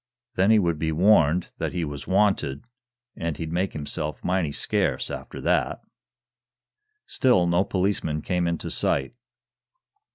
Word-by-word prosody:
Then 95 -1 +2
he 110 - +6
would 85 -6 +1
be 80 0 0
warned 85 -1 +3
that - - -2
he 85 -2 -1
was 70 -2 -7
wanted, 95 - +1 0.5
and 85 -3 -3
he'd 80 0 -5
make 90 +3 -1
himself 75 0 -4
mighty 90 -4 0
scarce - - -1
after - - -7
that." - - +1 1.3
Still 120 -9 +3
no 85 +2 +3
policeman 90 -6 -1
came 90 -1 0
into 85 -1 -3
sight. 70 - -1
85 Hz, 135 wpm, -25 LUFS, 75-95 Hz, 1.3 s, he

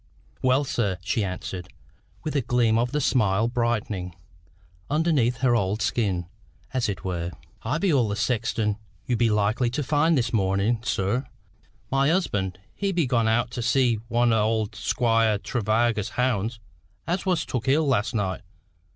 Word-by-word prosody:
"Well, 130 +2 +3
sir," 105 -8 -1
she 105 +3 0
answered, 90 -1 -5 0.6
with 155 -2 -3
a 140 - +3
gleam 115 -2 +2
of 120 +1 0
the 150 - 0
smile 110 -5 +2
brightening 110 -7 -2 0.7
underneath 145 -6 +1
her 125 -2 +4
old 100 0 0
skin, 100 -7 0 0.5
as 130 -3 0
it 95 -5 -4
were, 85 -2 -2 0.3
"I 150 - -1
be 185 -1 +1
all 125 -5 +3
the 100 - -2
sexton 110 -2 0 0.3
you 125 - 0
be 115 0 +2
likely 105 +3 +1
to 145 +5 -2
find 150 +3 +2
this 120 -2 0
mornin', 100 +2 +1
sir. 115 +4 -1 0.6
My 135 +2 +3
husband, 105 - 0 0.2
he 200 -1 -1
be 170 -4 +1
gone 120 -3 +1
out 120 +2 +1
to 120 - -4
see 120 -2 +2
one 120 0 +2
o' 110 -1 +1
Squire 115 -1 +2
Tregarva's 110 0 0
hounds 120 -2 -1 0.5
as 180 +3 -2
was 175 -3 +1
took 125 0 -3
ill 150 +4 +3
last 120 -3 +1
night. 95 -3 -1
115 Hz, 160 wpm, -25 LUFS, 105-130 Hz, 0.7 s, her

